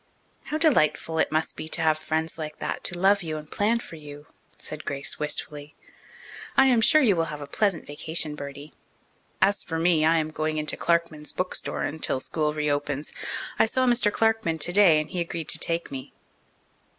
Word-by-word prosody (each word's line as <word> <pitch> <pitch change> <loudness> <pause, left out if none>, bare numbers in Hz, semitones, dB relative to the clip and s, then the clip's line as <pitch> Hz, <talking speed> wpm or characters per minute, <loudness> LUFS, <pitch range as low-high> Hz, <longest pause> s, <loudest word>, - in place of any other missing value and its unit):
"How 305 - -2
delightful 165 - +2
it - - +2
must 155 +1 0
be 155 - -6
to 165 - 0
have 155 -1 +4
friends 160 +1 -2
like 155 -1 -6
that - - -4
to 175 - +1
love 195 +2 +4
you 160 -2 -4
and 150 0 -10
plan 215 +3 +1
for 165 - -10
you," 145 -1 -11 0.3
said 155 0 -6
Grace 140 0 -3
wistfully. 150 0 -4 0.8
"I 270 - +7
am 245 -4 +4
sure 310 +6 +5
you 210 -7 +4
will 165 -1 +1
have 150 -2 -6
a 145 - -6
pleasant 185 +3 0
vacation, 155 +1 -2
Bertie. 140 0 -8 0.7
As 200 +1 +3
for 165 - -4
me, 165 -1 +3
I 165 +1 +4
am 155 -1 -1
going 155 0 -2
into 150 -1 0
Clarkman's 170 -3 0
bookstore 185 0 -2
until 155 -3 -1
school 150 +3 -1
reopens. 145 -1 -2 0.5
I - - +5
saw 255 +3 +1
Mr. 240 -4 +3
Clarkman 225 -7 +1
today 175 +1 +5
and 155 - -3
he 180 -2 -3
agreed 165 -2 -4
to - - +4
take 170 -2 -2
me." 130 -1 -7
160 Hz, 185 wpm, -25 LUFS, 150-185 Hz, 0.8 s, I